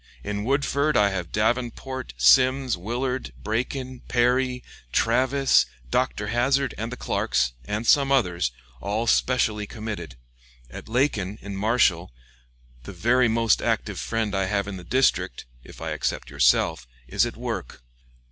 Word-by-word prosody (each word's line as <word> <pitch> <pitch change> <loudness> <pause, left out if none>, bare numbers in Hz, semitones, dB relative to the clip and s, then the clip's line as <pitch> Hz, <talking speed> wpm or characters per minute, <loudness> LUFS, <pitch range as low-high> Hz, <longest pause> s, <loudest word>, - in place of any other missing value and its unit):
In 105 +4 -3
Woodford 140 +3 +1
I 100 -1 +4
have 95 -3 -4
Davenport, 120 - -2
Simms, 125 - +4
Willard, 125 +7 -3
Braken, 125 +3 -3
Perry, 125 +1 +1 0.3
Travis, 130 - +3 0.2
Dr. - - 0
Hazzard, 135 +3 +1
and 115 +2 -5
the 125 - -6
Clarks, - - 0
and 110 +3 -3
some 140 +2 +4
others, 90 - +1 0.3
all 105 +3 -1
specially 110 -3 +1
committed. 105 - -6 0.6
At - - -10
Lacon, 110 -6 0
in 100 -1 -6
Marshall, 95 - +2 0.7
the - - -9
very 125 +2 +3
most 115 0 +2
active - - -1
friend 110 -3 -2
I 95 -1 +1
have 100 0 -1
in 100 -2 -5
the 90 - -10
district 130 - +1 0.2
(if - - -13
I 80 0 -4
except 65 -3 -3
yourself) 60 -2 +2 0.2
is - - +2
at - - -8
work. - - -5
115 Hz, 140 wpm, -24 LUFS, 95-130 Hz, 0.7 s, I